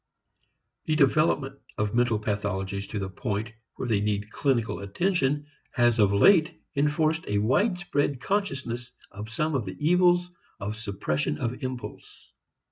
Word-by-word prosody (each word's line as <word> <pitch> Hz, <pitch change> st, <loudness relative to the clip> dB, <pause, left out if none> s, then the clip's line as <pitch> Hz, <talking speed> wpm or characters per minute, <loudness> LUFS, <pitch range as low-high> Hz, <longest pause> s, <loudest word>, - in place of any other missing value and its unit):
The 155 Hz, -, +1 dB
development 140 Hz, -2 st, +2 dB, 0.2 s
of 105 Hz, -1 st, -1 dB
mental 120 Hz, -2 st, +2 dB
pathologies 100 Hz, -2 st, -2 dB
to 110 Hz, -, -4 dB
the 100 Hz, -1 st, -2 dB
point 105 Hz, +2 st, -3 dB, 0.2 s
where 130 Hz, -, -4 dB
they 110 Hz, -4 st, +2 dB
need 105 Hz, 0 st, -1 dB
clinical 125 Hz, -6 st, 0 dB
attention 145 Hz, -, 0 dB, 0.3 s
has 120 Hz, -2 st, +3 dB
of 100 Hz, -2 st, +5 dB
late 155 Hz, -, +5 dB, 0.2 s
enforced 155 Hz, +3 st, +1 dB
a 105 Hz, -, 0 dB
widespread 145 Hz, -, +1 dB
consciousness 130 Hz, -, -2 dB, 0.2 s
of 105 Hz, +2 st, -8 dB
some 155 Hz, +8 st, -1 dB
of 130 Hz, -6 st, 0 dB
the 95 Hz, 0 st, -6 dB
evils 175 Hz, +2 st, +3 dB, 0.3 s
of 105 Hz, +2 st, -3 dB
suppression 95 Hz, -9 st, -2 dB
of 120 Hz, -, -3 dB
impulse. 130 Hz, -1 st, -7 dB
120 Hz, 135 wpm, -27 LUFS, 105-150 Hz, 0.3 s, of